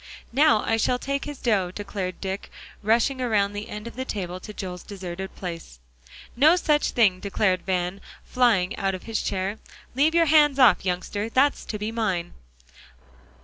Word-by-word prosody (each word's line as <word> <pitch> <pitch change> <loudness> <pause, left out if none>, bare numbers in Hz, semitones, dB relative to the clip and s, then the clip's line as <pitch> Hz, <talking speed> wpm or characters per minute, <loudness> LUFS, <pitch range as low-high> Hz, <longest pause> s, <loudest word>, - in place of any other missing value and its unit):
"Now 285 -4 +4
I 225 - +1
shall 245 +3 +1
take 275 +2 -3
his 290 -1 -6
dough," 205 -8 +1
declared 195 -1 -5
Dick, 190 0 -4 0.3
rushing 235 +5 +2
around 205 -5 +1
the 205 +1 -6
end 210 +1 -7
of 235 - -8
the 260 - -3
table 185 -7 -5
to 210 - -9
Joel's 180 -4 -6
deserted 190 -2 -7
place. 165 - -7 0.6
"No 300 +7 +6
such 300 -4 +1
thing," 200 -6 +3
declared 190 -1 0
Van, 180 +1 -1 0.2
flying 230 -6 +2
out 195 -1 -1
of 185 - -9
his 225 -1 -2
chair. 195 +2 -2 0.3
"Leave 295 +6 +2
your 335 -1 +5
hands 295 -2 +5
off, 255 -5 +5
youngster! 190 +4 -2
that's 270 +5 +2
to 210 - -4
be 210 +2 -3
mine." 195 -7 -2
210 Hz, 170 wpm, -25 LUFS, 190-250 Hz, 0.6 s, No